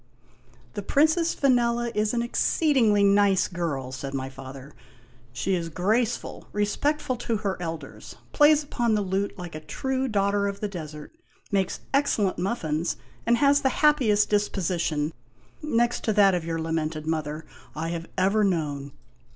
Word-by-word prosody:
" 120 Hz, +1 st, -29 dB
The -, -, -4 dB
Princess 315 Hz, -, +2 dB
Vanella 240 Hz, -3 st, +2 dB
is 210 Hz, 0 st, +1 dB
an 235 Hz, -1 st, 0 dB
exceedingly 235 Hz, -4 st, +2 dB
nice 200 Hz, -1 st, +4 dB
girl," 155 Hz, -7 st, -3 dB
said 135 Hz, +1 st, -5 dB
my 135 Hz, 0 st, -3 dB
father. 135 Hz, +1 st, -10 dB, 0.3 s
" 125 Hz, +1 st, -29 dB
She 150 Hz, +10 st, -1 dB
is 170 Hz, -2 st, -1 dB
graceful, 215 Hz, +8 st, -1 dB
respectful 255 Hz, +7 st, 0 dB
to 230 Hz, -1 st, -1 dB
her 200 Hz, -2 st, -2 dB
elders, 165 Hz, -2 st, -7 dB, 0.2 s
plays 300 Hz, 0 st, +5 dB
upon 240 Hz, -5 st, 0 dB
the 210 Hz, -, +1 dB
lute 195 Hz, +1 st, -2 dB
like 175 Hz, -2 st, -7 dB
a 155 Hz, -, -5 dB
true 260 Hz, -, -2 dB
daughter 200 Hz, -2 st, +1 dB
of 200 Hz, 0 st, -4 dB
the 210 Hz, -, -2 dB
desert, 155 Hz, -, -8 dB, 0.4 s
makes 195 Hz, -2 st, 0 dB
excellent 225 Hz, -10 st, +1 dB
muffins, 170 Hz, -5 st, -1 dB, 0.3 s
and 235 Hz, 0 st, +4 dB
has 280 Hz, +2 st, +4 dB
the 265 Hz, -, +2 dB, 0.2 s
happiest 235 Hz, -9 st, +4 dB
disposition 170 Hz, -7 st, 0 dB, 0.5 s
(next 240 Hz, -5 st, 0 dB
to 220 Hz, -, +2 dB
that 200 Hz, -2 st, +5 dB
of 175 Hz, -2 st, -1 dB
your 165 Hz, 0 st, -3 dB
lamented 160 Hz, -1 st, -2 dB
mother) 155 Hz, -1 st, -3 dB, 0.3 s
I 160 Hz, +2 st, -3 dB
have 170 Hz, 0 st, -5 dB
ever 195 Hz, +3 st, +3 dB
known. 145 Hz, -7 st, -1 dB
195 Hz, 155 wpm, -26 LUFS, 160-235 Hz, 0.5 s, plays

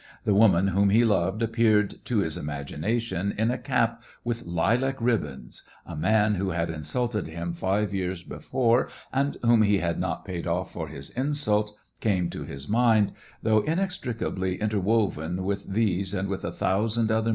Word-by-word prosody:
The 105 Hz, -, +2 dB
woman 100 Hz, -3 st, +5 dB
whom 100 Hz, +2 st, +3 dB
he 115 Hz, +4 st, +5 dB
loved 100 Hz, +1 st, +1 dB
appeared 110 Hz, -3 st, +2 dB
to 120 Hz, -, 0 dB
his 80 Hz, -5 st, -1 dB
imagination 90 Hz, +8 st, -2 dB
in 110 Hz, +3 st, +2 dB
a 125 Hz, -, -1 dB
cap 115 Hz, -4 st, 0 dB, 0.2 s
with 120 Hz, -4 st, -3 dB
lilac 120 Hz, +11 st, +1 dB
ribbons, 90 Hz, -, -2 dB, 0.2 s
a 85 Hz, -, -7 dB
man 105 Hz, +7 st, +3 dB
who 95 Hz, 0 st, -1 dB
had 85 Hz, -1 st, -1 dB
insulted 105 Hz, +8 st, -2 dB
him 85 Hz, +1 st, -4 dB
five 100 Hz, +4 st, 0 dB
years 90 Hz, -2 st, -2 dB
before, 120 Hz, +5 st, +1 dB, 0.2 s
and 140 Hz, +2 st, 0 dB
whom 115 Hz, -1 st, +5 dB
he 105 Hz, -1 st, +4 dB
had 85 Hz, -3 st, -1 dB
not -, -, -2 dB
paid 90 Hz, -2 st, -4 dB
off 90 Hz, +2 st, -2 dB
for 80 Hz, -2 st, -4 dB
his 70 Hz, -2 st, -6 dB
insult, 110 Hz, -6 st, 0 dB, 0.2 s
came 95 Hz, -5 st, +1 dB
to -, -, -5 dB
his 70 Hz, +1 st, -8 dB
mind, 110 Hz, -2 st, +3 dB, 0.3 s
though 110 Hz, -1 st, +4 dB
inextricably 125 Hz, -, -2 dB
interwoven 100 Hz, -5 st, 0 dB
with 100 Hz, +1 st, -2 dB
these 100 Hz, -2 st, 0 dB
and 95 Hz, 0 st, -2 dB
with 95 Hz, -, -3 dB
a -, -, -2 dB
thousand -, -, -1 dB
other 100 Hz, +4 st, +2 dB
SEVASTOPOL 110 Hz, 0 st, +1 dB
IN 110 Hz, -, -2 dB
MAY. -, -, +1 dB
105 Hz, 175 wpm, -26 LUFS, 90-115 Hz, 0.3 s, woman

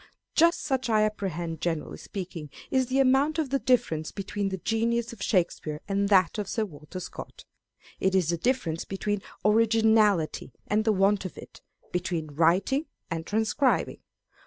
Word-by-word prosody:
Just 335 Hz, +1 st, +4 dB
such 265 Hz, -4 st, -1 dB
I 215 Hz, -1 st, +4 dB
apprehend, 175 Hz, -6 st, -3 dB
generally 165 Hz, -3 st, -2 dB
speaking, 180 Hz, -6 st, -7 dB, 0.2 s
is 260 Hz, -2 st, +2 dB
the 260 Hz, +2 st, 0 dB
amount 270 Hz, +4 st, +3 dB
of 305 Hz, -5 st, -1 dB
the 275 Hz, -, +2 dB
difference 220 Hz, -13 st, +1 dB
between 200 Hz, 0 st, -3 dB
the 190 Hz, -, -3 dB
genius 230 Hz, +4 st, 0 dB
of 215 Hz, -, -13 dB
Shakespeare 170 Hz, -6 st, 0 dB
and 200 Hz, 0 st, 0 dB
that 190 Hz, +1 st, +4 dB
of 205 Hz, -, -3 dB
Sir 220 Hz, -2 st, 0 dB
Walter 155 Hz, 0 st, -9 dB
Scott. 180 Hz, -, -9 dB, 0.5 s
It 190 Hz, 0 st, +1 dB
is 180 Hz, -4 st, +2 dB
the 170 Hz, -, +1 dB
difference 170 Hz, -6 st, -1 dB
between 205 Hz, +1 st, -2 dB, 0.2 s
originality 220 Hz, -5 st, +3 dB
and 215 Hz, +1 st, +1 dB
the 220 Hz, -, +4 dB
want 200 Hz, 0 st, +2 dB
of 185 Hz, -, -7 dB
it, -, -, -12 dB, 0.3 s
between 170 Hz, -4 st, -2 dB
writing 185 Hz, -, +2 dB, 0.2 s
and 165 Hz, -1 st, -3 dB
transcribing. 220 Hz, +6 st, +1 dB
205 Hz, 160 wpm, -27 LUFS, 175-230 Hz, 0.5 s, Just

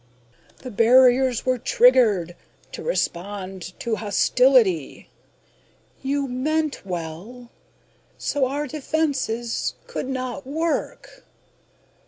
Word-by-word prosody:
"The 255 Hz, -, -7 dB
barriers 250 Hz, +2 st, +4 dB
were 255 Hz, -1 st, +1 dB
triggered... 225 Hz, -9 st, +3 dB, 0.4 s
to -, -, -7 dB
respond 190 Hz, -, -4 dB
to 230 Hz, -2 st, -1 dB
hostility.... 215 Hz, -, +2 dB, 0.9 s
You 275 Hz, +1 st, -1 dB
meant 300 Hz, +4 st, -2 dB
well... 185 Hz, +7 st, -7 dB, 0.7 s
so 280 Hz, -3 st, 0 dB
our 290 Hz, +3 st, -3 dB
defenses... 270 Hz, -5 st, -2 dB
could 480 Hz, -, -5 dB
not 255 Hz, 0 st, -4 dB
work." 320 Hz, +4 st, -3 dB
250 Hz, 85 wpm, -23 LUFS, 205-270 Hz, 0.9 s, barriers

